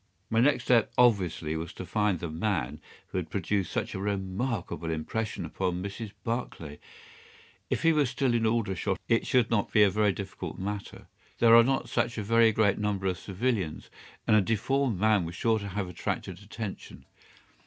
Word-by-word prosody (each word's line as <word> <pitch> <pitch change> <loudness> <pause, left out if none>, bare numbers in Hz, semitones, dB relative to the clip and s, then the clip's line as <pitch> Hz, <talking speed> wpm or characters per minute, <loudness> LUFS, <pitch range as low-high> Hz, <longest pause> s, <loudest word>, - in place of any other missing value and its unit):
My 115 - +3
next 130 0 +3
step 120 -3 +3
obviously 90 -10 +2
was 80 +1 -5
to 95 - -7
find 105 -1 +1
the 85 - -4
man 85 +2 -2 0.3
who 95 - -2
had 85 -3 -6
produced 100 +1 -1
such - - -2
a - - -4
remarkable 95 - -3
impression 95 +7 -3
upon 90 -1 -2
Mrs. 100 +2 -6
Barclay. 100 -11 -4 0.9
If - - -1
he 165 0 +5
were 150 -3 +3
still 125 0 0
in 115 -1 +2
Aldershot 110 -4 0
it 115 - +2
should 125 -3 +2
not 105 -3 +1
be 105 - +6
a 100 - +4
very 105 +1 +2
difficult 95 0 -6
matter. 100 +1 -5 0.3
There 115 -1 +6
are 115 - +9
not 135 +2 0
such 115 -1 -1
a 105 - -2
very 115 +1 +4
great 105 -2 +2
number 105 -2 -1
of 90 -2 0
civilians, 100 -5 -2 0.3
and 110 - +4
a 105 - +6
deformed 115 +2 0
man 110 -2 +3
was 85 +1 -6
sure 110 +4 +1
to 100 - -6
have 100 0 -3
attracted 90 +1 -4
attention. 105 0 -8
105 Hz, 180 wpm, -28 LUFS, 95-115 Hz, 0.9 s, are